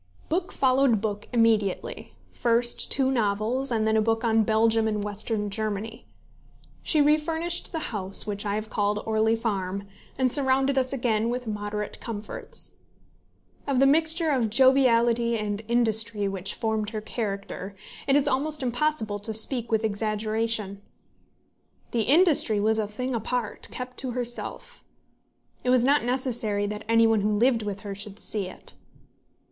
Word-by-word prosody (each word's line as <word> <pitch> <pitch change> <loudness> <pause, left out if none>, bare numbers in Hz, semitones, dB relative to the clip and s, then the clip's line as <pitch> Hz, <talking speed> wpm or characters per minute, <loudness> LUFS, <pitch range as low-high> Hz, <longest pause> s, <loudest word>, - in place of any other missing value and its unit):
Book 345 +3 -1
followed 260 -3 +3
book 210 -1 -4
immediately, 225 -5 0 0.2
first 240 0 0
two 265 -1 +2
novels, 230 +3 0
and 220 -2 +1
then 220 - +2
a 220 - +3
book 225 +1 0
on 225 -1 +3
Belgium 220 +1 +2
and 210 -1 -1
Western 210 0 -2
Germany. 215 +1 -4 0.7
She 310 - +1
refurnished 320 +3 0
the 320 -7 -4
house 195 -2 +2
which 205 -1 -3
I 205 -1 -2
have 215 +1 -4
called 205 0 0
Orley 220 0 +2
Farm, 200 -4 -3 0.3
and 255 -2 +2
surrounded 270 -1 +3
us 260 -1 +1
again 235 -4 0
with 250 +1 -3
moderate 210 -1 -4
comforts. 215 -2 -5 0.9
Of 275 -2 0
the 270 - +5
mixture 320 +3 +5
of 245 -5 +1
joviality 235 -2 +4
and 210 -1 -3
industry 225 -3 +2
which 195 0 -2
formed 220 -2 -2
her 220 -1 -5
character, 200 -3 -5 0.3
it 275 - +3
is 290 - +4
almost 290 +2 -1
impossible 245 -4 -1
to 215 +2 -3
speak 235 +1 +1
with 220 0 +1
exaggeration. 215 -1 -2 1.1
The 235 - 0
industry 290 - +4
was 220 +2 +2
a 210 - -1
thing 250 +5 -4
apart, 230 0 -3
kept 250 0 -7
to 255 -2 -4
herself. 250 - -3 0.8
It 250 - -1
was 250 -1 +4
not 285 +2 +3
necessary 240 -5 -1
that 210 +1 -5
any 230 0 +5
one 225 -2 +3
who 210 +1 +1
lived 235 +1 +3
with 205 -1 -5
her 200 -1 -6
should 200 0 -6
see 205 -3 -2
it. - - -10
225 Hz, 150 wpm, -26 LUFS, 210-255 Hz, 1.1 s, the